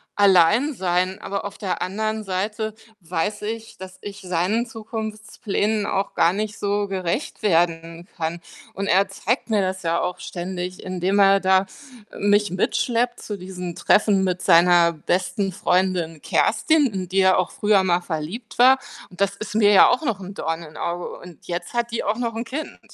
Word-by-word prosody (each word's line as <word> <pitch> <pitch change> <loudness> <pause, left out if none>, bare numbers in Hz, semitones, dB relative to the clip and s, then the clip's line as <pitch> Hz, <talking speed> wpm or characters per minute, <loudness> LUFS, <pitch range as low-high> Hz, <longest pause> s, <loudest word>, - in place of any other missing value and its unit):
Alleinsein, 190 - +3
aber 200 0 -3
auf 200 - -7
der 190 -3 -3
anderen 215 +3 -2
Seite 210 +3 -3 0.2
weiß 195 +4 -3
ich, 225 +1 -6
dass 185 0 -10
ich 205 0 -8
seinen 185 +6 0
Zukunftsplänen 220 -1 -3
auch 195 +1 -1
gar 170 - +3
nicht 210 +2 -4
so 205 0 0
gerecht 190 - -3
werden 170 -3 0
kann 165 +1 -3 0.4
und 195 - -3
er 195 +1 +3
zeigt 240 +4 -2
mir 215 -2 +2
das 190 0 -3
ja 170 0 0
auch 180 0 -3
ständig, 180 0 -5
indem 185 +1 -1
er 195 0 +6
da 190 0 +3 0.5
mich 205 0 +2
mitschleppt 240 +6 0
zu 210 - -5
diesen 180 -1 -6
Treffen 205 -2 +3
mit 185 -1 -1
seiner 170 0 +5
besten 185 +5 -1
Freundin 180 -3 0
Kerstin, 295 +7 +2
in 185 -2 -4
die 195 +1 +2
er 190 0 +4
auch 185 - 0
früher 205 -2 +3
mal 180 -1 +2
verliebt 175 +9 -6
war. 260 +2 +7 0.3
Und 180 - -16
das 200 0 +1
ist 215 0 -7
mir 210 -2 +5
ja - - +8
auch 250 - +1
noch 225 -7 -1
'n 195 +1 -9
Dorn 165 -2 -3
in 155 -2 -12
Auge 175 +1 -3
und 175 -3 -14
jetzt 175 +5 -4
hat 235 0 -1
die 235 - -3
auch 210 +2 -1
noch 235 -2 -2
'n 230 - -2
Kind. 300 +6 -6
195 Hz, 175 wpm, -22 LUFS, 180-215 Hz, 0.5 s, ja